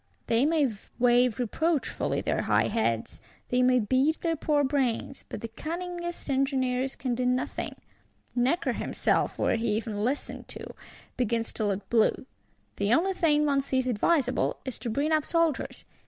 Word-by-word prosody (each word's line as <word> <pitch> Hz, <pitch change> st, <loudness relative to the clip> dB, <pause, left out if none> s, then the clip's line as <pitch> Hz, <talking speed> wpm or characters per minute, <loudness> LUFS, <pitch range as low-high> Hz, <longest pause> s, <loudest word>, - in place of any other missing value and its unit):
They 235 Hz, +5 st, +3 dB
may 310 Hz, -3 st, +3 dB, 0.3 s
wave 245 Hz, -1 st, +4 dB
reproachfully 295 Hz, +6 st, 0 dB
their -, -, 0 dB
high -, -, +3 dB
heads; 115 Hz, -, -1 dB, 0.3 s
they 250 Hz, 0 st, +2 dB
may 250 Hz, 0 st, +4 dB
beat 260 Hz, +8 st, +1 dB
their 330 Hz, -1 st, 0 dB
poor 295 Hz, -1 st, +1 dB
brains; 265 Hz, -1 st, -1 dB
but -, -, -6 dB
the 230 Hz, -, -4 dB
cunningest 345 Hz, +7 st, -5 dB
engineers 265 Hz, -1 st, 0 dB
can 255 Hz, -2 st, -2 dB
do 250 Hz, +1 st, -1 dB
nothing. 250 Hz, +1 st, -1 dB, 0.6 s
Necker 255 Hz, +8 st, +1 dB
himself, -, -, 0 dB
were -, -, +1 dB
he 230 Hz, +1 st, -1 dB
even 215 Hz, -2 st, -3 dB
listened 265 Hz, +5 st, -3 dB
to, -, -, -8 dB, 0.4 s
begins 230 Hz, -2 st, 0 dB
to 215 Hz, -, -1 dB
look 200 Hz, 0 st, -2 dB
blue. 230 Hz, +2 st, +3 dB, 0.5 s
The 200 Hz, +1 st, +1 dB
only 365 Hz, +10 st, +3 dB
thing 300 Hz, -4 st, +3 dB
one 280 Hz, -2 st, +2 dB
sees 260 Hz, -1 st, 0 dB
advisable 255 Hz, +3 st, +1 dB
is 260 Hz, -4 st, -4 dB
to 235 Hz, +1 st, -4 dB
bring 285 Hz, +7 st, 0 dB
up 310 Hz, -1 st, +3 dB
soldiers. 335 Hz, -4 st, 0 dB
260 Hz, 155 wpm, -28 LUFS, 235-300 Hz, 0.6 s, wave